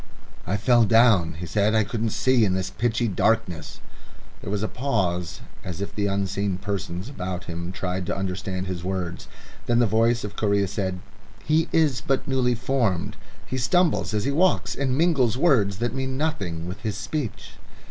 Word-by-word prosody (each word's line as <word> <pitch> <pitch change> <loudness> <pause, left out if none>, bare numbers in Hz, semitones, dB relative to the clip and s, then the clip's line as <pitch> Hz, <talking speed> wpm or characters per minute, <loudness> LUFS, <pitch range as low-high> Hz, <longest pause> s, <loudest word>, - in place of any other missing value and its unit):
"I 95 +4 +1
fell 120 +2 +4
down," 110 -8 +4
he 85 +3 -6
said; 105 +5 +1
"I 110 - +4
couldn't 110 +2 -2
see 130 +2 +3
in 95 -3 +2
this 95 0 -2
pitchy 120 0 0
darkness." 105 -4 0 0.6
There - - -6
was 105 0 -1
a - - +1
pause 95 - -1 0.2
as 90 -1 -6
if 100 - -4
the 100 -1 0
unseen 100 -1 -1
persons 95 -1 -4
about 95 -9 -5
him 85 0 -5
tried 90 -1 -3
to - - -1
understand 95 -1 -3
his 90 -2 -4
words. 90 -2 -3 0.4
Then 120 - +3
the 120 - +5
voice 115 +2 +2
of 105 0 -6
Correa 100 -2 +1
said: 95 -1 -3 0.4
"He 155 +2 +2
is 150 -5 +2
but 135 -2 -1
newly 130 -2 +2
formed. 115 -7 0 0.3
He 130 - -3
stumbles 165 -4 +2
as 105 - 0
he 140 - +1
walks 180 +6 +2
and 130 -1 -1
mingles 140 -9 +3
words 115 - +3
that 120 +1 -1
mean 130 0 -3
nothing 95 - -2
with 90 +3 -7
his 105 -2 -3
speech." 120 +1 -4
105 Hz, 180 wpm, -24 LUFS, 95-125 Hz, 0.6 s, the